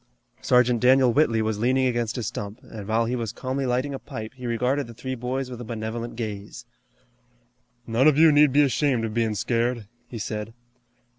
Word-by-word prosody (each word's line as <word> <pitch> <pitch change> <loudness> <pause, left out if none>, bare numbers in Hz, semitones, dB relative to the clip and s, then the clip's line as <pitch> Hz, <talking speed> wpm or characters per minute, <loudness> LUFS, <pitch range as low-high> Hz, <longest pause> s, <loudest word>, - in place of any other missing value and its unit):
Sergeant 125 -1 +3
Daniel 130 0 +5
Whitley 115 -6 +2
was 110 -1 -2
leaning 130 +3 +2
against 120 -1 -1
a 120 - -3
stump, 105 0 -5
and 105 -3 -9
while 115 +1 +1
he 120 +2 -1
was 115 -3 -3
calmly 130 +1 -3
lighting 130 +3 -1
a 135 - -5
pipe 115 -6 -8
he 125 -2 -7
regarded 125 +3 0
the 115 - -11
three 130 +2 -5
boys 130 +1 -3
with 120 -1 -7
a - - -5
benevolent 115 +1 -5
gaze. 110 0 -6 1.2
"None 120 +5 +3
of 150 -2 +4
you 160 0 +7
need 145 -1 +5
be 145 +3 +5
ashamed 135 -3 +1
of 110 - -4
bein' 115 -2 0
scared," 115 0 -1 0.2
he 120 - -8
said. 110 +1 -5
120 Hz, 195 wpm, -25 LUFS, 115-130 Hz, 1.2 s, you